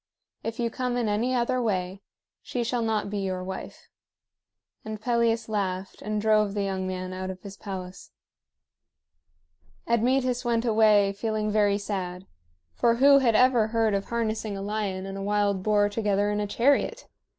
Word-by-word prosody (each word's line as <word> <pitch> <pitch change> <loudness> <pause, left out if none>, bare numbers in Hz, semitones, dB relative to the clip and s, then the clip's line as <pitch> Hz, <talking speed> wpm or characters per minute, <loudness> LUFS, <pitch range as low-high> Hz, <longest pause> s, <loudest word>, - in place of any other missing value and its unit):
If 225 +1 -4
you 235 -1 0
come 250 0 -2
in 240 -2 0
any 230 +5 0
other 250 +1 +1
way, 190 -3 -2 0.4
she 245 - -3
shall 240 +1 -1
not 220 -3 -1
be 205 - -2
your 185 -2 -3
wife." 190 +1 -8 1.0
And 215 0 -6
Pelias 230 0 +1
laughed, 190 -3 -3
and 215 +1 -2
drove 215 -1 +2
the 205 - 0
young 190 -1 -2
man 185 0 -4
out 185 0 -4
of 185 -1 -6
his 200 -1 -9
palace. 185 -3 -8 1.8
Admetus 250 +2 +1
went 235 -1 0
away 215 -3 +4
feeling 215 0 -2
very 205 -1 +3
sad; 190 -3 -4 0.5
for 235 -1 +2
who 275 +3 +6
had 235 -4 +2
ever 245 -2 +4
heard 225 -1 +1
of 195 0 -1
harnessing 220 -3 -2
a - - -5
lion 200 -2 -3
and 195 0 -6
a - - -5
wild 205 -1 +1
boar 205 0 +3
together 205 -1 0
in 210 - -1
a 205 - -1
chariot? 280 - +1
210 Hz, 165 wpm, -26 LUFS, 195-235 Hz, 1.8 s, who